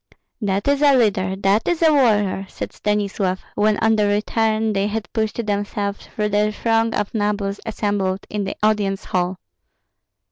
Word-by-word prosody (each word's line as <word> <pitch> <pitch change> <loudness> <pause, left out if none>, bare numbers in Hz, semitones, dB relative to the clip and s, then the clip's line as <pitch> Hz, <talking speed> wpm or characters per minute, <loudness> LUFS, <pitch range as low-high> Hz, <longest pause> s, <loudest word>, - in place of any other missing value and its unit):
"That 200 +1 -1
is 280 0 +2
a 285 -2 +6
leader, 195 -5 +1
that 195 +2 +1
is 345 -1 +1
a 315 -1 +5
warrior!" 210 -8 +2
said - - -6
Stanislav, 200 -2 -1
when 215 0 +2
on 225 0 +3
the 210 -1 +2
return 220 +1 +1
they 200 0 +1
had 215 +1 -4
pushed 220 +1 -1
themselves 205 0 -3
through 210 -1 -2
the 210 +1 +2
throng 225 +1 +1
of 205 - -2
nobles 205 -2 -1
assembled 205 -3 -1
in 210 -1 -3
the 195 - -4
audience 205 -2 +1
hall. 180 0 -1
210 Hz, 165 wpm, -21 LUFS, 200-220 Hz, -, a